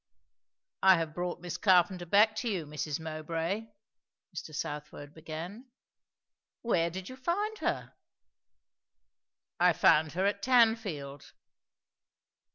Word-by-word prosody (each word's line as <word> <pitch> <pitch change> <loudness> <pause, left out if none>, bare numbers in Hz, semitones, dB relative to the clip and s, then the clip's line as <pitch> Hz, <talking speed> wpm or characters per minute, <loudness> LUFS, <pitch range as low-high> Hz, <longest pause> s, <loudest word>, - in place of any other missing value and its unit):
"I 190 -1 +7
have 165 -2 -3
brought 175 0 -4
Miss 175 0 -5
Carpenter 180 -2 +3
back 215 +4 +5
to 240 - -1
you, 185 -7 -2
Mrs. 150 0 -4
Mowbray," 165 +6 -3 0.7
Mr. 155 -2 -7
Southwode 150 -1 -6
began. 165 +10 -8 1.0
"Where 170 -8 +1
did 185 +2 -7
you 255 - -8
find 405 +10 -2
her?" - - -2 1.7
"I - - +5
found 155 0 +4
her 185 +3 0
at 200 0 0
Tanfield." 220 - +1
175 Hz, 110 wpm, -30 LUFS, 155-210 Hz, 1.7 s, I